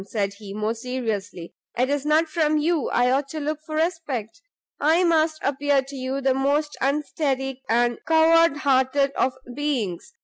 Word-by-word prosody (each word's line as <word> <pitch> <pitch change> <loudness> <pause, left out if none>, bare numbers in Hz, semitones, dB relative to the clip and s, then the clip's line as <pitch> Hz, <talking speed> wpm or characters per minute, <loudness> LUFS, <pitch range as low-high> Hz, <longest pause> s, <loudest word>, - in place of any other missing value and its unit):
said 200 -2 -2
he, 205 -2 -9
more 215 +2 -2
seriously, 220 -7 -4 0.2
"it 250 +1 +2
is 285 +1 -1
not 315 +2 +3
from 310 -1 +1
you 310 -1 0
I 245 +1 +2
ought 275 +2 +1
to 310 +3 -6
look 305 +1 -3
for 310 -1 -7
respect! 310 - -2 0.4
I 320 +5 +3
must 320 -2 +2
appear 280 0 +1
to 275 +1 -10
you 265 +1 -3
the 265 -1 +2
most 285 +3 0
unsteady 270 -2 -1
and 240 0 +2
coward 325 -1 +5
hearted 275 0 +2
of 260 -2 0 0.2
beings. 260 - -2
275 Hz, 165 wpm, -23 LUFS, 250-310 Hz, 0.4 s, coward